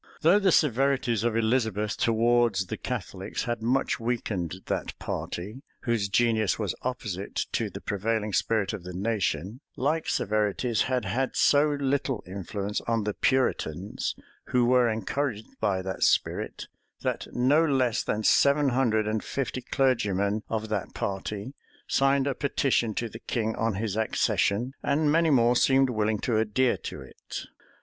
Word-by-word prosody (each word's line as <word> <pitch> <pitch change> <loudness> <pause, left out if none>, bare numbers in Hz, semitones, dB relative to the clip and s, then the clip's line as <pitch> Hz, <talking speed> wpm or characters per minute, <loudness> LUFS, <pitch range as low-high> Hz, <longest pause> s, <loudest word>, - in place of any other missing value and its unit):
Though 175 +6 +5
the 195 -2 +3
severities 135 -6 +2
of 115 -1 +1
Elizabeth 110 -2 +1
towards 115 -3 +2
the - - -5
Catholics - - -4
had 120 -2 -3
much 130 +3 +1
weakened 110 -8 -2
that - - -3
party, 105 +9 -5 0.2
whose 115 -5 0
genius 110 -2 +2
was 105 -5 -2
opposite 105 -7 -4 0.2
to - - -1
the - - -8
prevailing 105 +1 -1
spirit 110 -2 +1
of 105 -5 -6
the 90 0 -7
nation, 100 - -1 0.2
like 155 +5 0
severities 105 +2 0
had 125 -3 0
had 130 +7 -1
so 145 +1 +4
little 135 -3 -1
influence 100 +2 -4
on 115 -2 +1
the 105 0 -1
Puritans, 100 - 0 0.3
who 125 -1 +2
were 125 -1 +4
encouraged 110 +1 -2
by 95 -2 0
that 95 0 -5
spirit, - - +1 0.4
that - - -2
no 135 +6 +4
less 130 -6 +2
than 110 +1 -2
seven 140 +5 +4
hundred 115 -4 +1
and 110 0 -1
fifty 135 -1 -3
clergymen 110 -6 +1
of 110 -1 -2
that 105 -3 -3
party 100 +5 -4 0.3
signed 135 0 +2
a 140 - 0
petition 130 -5 0
to 120 - -1
the 115 0 -10
king 110 -3 -2
on 115 -2 0
his 105 0 -2
accession; 110 +2 +1
and 145 +1 +2
many 165 +1 +3
more 120 -3 +4
seemed 135 +1 +4
willing 110 -1 0
to 110 0 0
adhere 110 +4 +2
to - - -7
it. - - -8
115 Hz, 150 wpm, -27 LUFS, 105-130 Hz, 0.4 s, Though